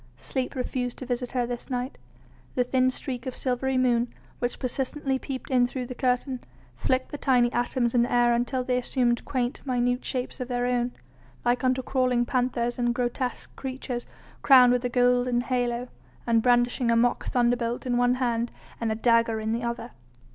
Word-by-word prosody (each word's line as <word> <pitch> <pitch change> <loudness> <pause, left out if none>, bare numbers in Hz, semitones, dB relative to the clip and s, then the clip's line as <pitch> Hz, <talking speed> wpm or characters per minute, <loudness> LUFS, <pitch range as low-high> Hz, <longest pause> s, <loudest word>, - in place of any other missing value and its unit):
Sleep 260 0 -3
refused 250 -1 -2
to 260 - -7
visit 245 0 -3
her 250 -2 +1
this 240 0 -6
night; 250 +1 -3 0.6
the 250 - +3
thin 255 +1 +2
streak 255 -1 -5
of 255 - -4
silvery 260 +1 0
moon, 245 -1 +2 0.3
which 245 0 -2
persistently 265 +1 -2
peeped 270 0 -6
in 250 -1 +4
through 250 0 -4
the 250 - -6
curtain, 250 +1 0 0.4
flicked 255 - 0
the 290 - -5
tiny 250 -3 +3
atoms 240 0 0
in 240 - +4
the 240 - 0
air 240 0 +4
until 245 +2 0
they 250 0 +1
assumed 245 -1 0
quaint, 250 -1 -2
minute 245 -1 0
shapes 255 0 -3
of 250 - -3
their 245 -1 -1
own, 245 0 0 0.5
like 245 +2 +2
unto 255 0 +2
crawling 250 -2 +1
panthers 245 -1 0
and 240 0 +1
grotesque 245 +1 -3
creatures 255 -2 -5 0.3
crowned 250 -3 +7
with 250 0 0
a 245 - 0
golden 245 0 +3
halo, 245 -1 -1 0.4
and 230 -1 +3
brandishing 245 0 +2
a 230 - +4
mock 240 +1 +2
thunderbolt 240 -1 +1
in 245 -1 0
one 245 +1 +3
hand 240 -2 0 0.3
and 230 -1 -1
a - - 0
dagger 230 -1 +3
in 220 0 -2
the 235 - -1
other. 235 0 -4
245 Hz, 185 wpm, -26 LUFS, 240-255 Hz, 0.6 s, crowned